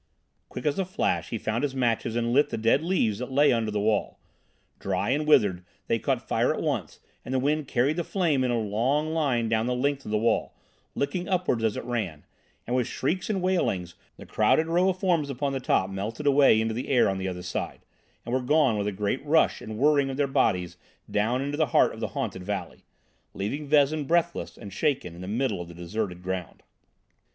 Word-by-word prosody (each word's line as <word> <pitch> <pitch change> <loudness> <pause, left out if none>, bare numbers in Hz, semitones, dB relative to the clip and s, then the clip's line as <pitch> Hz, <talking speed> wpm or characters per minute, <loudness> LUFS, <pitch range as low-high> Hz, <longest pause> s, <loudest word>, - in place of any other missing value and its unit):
Quick - - -7
as 150 +4 +1
a 190 - +1
flash 90 - -1
he 115 - -2
found 110 +2 -2
his 140 -2 -2
matches 120 -2 0
and 120 0 0
lit 145 +3 +4
the - - -3
dead 115 +5 +3
leaves 140 - 0
that 125 +1 -5
lay 145 +1 +4
under 115 -2 0
the 105 -1 -1
wall. 105 0 0 0.6
Dry 95 +4 -1
and 150 +3 0
withered, 100 -11 +4 0.2
they 115 - 0
caught - - -1
fire - - +2
at - - -2
once, - - -2 0.2
and - - -7
the 130 - +1
wind 145 +2 0
carried 135 +6 +1
the 175 - 0
flame 160 -8 +1
in 125 - +1
a 120 -1 +1
long 130 +9 0
line 135 -8 +1
down 110 +1 +1
the 125 - 0
length 140 +2 0
of - - -8
the 105 - +1
wall, 115 +1 0 0.4
licking 175 +7 -2
upwards 180 -11 0
as 110 -2 +1
it - - -4
ran; 100 -12 -3 0.4
and 120 - -1
with 125 -2 +1
shrieks 175 +9 -2
and 195 -4 -1
wailings, 95 - 0 0.2
the - - -11
crowded 160 - +2
row 175 +3 +2
of 185 - -1
forms 175 -6 +1
upon 140 +1 -2
the 135 - -1
top 95 -6 +1
melted 105 +8 -5
away 140 -5 +5
into 110 0 0
the 120 +3 -4
air 125 -5 +4
on 95 -1 -1
the 95 - -3
other 90 -1 -5
side, 90 - -4 0.4
and 120 - -4
were 130 - +1
gone 130 -4 +3
with 100 - -1
a - - 0
great 105 +7 -2
rush 155 +2 +2
and 110 0 -7
whirring 140 +1 +3
of 135 - -4
their 145 - +2
bodies 100 -10 0 0.3
down 115 +5 +1
into 145 +1 -3
the 155 -1 +2
heart - - +5
of - - -10
the - - -2
haunted 95 - -3
valley, 95 -3 -5 0.5
leaving 140 +10 -3
Vezin 150 +1 +3
breathless 170 +1 0
and 100 -4 -9
shaken 135 - -1
in 85 - -10
the 90 - -7
middle 110 -2 -1
of 85 - -7
the 85 - -11
deserted 90 +1 -4
ground. 90 -2 -5
125 Hz, 220 wpm, -26 LUFS, 105-145 Hz, 0.6 s, away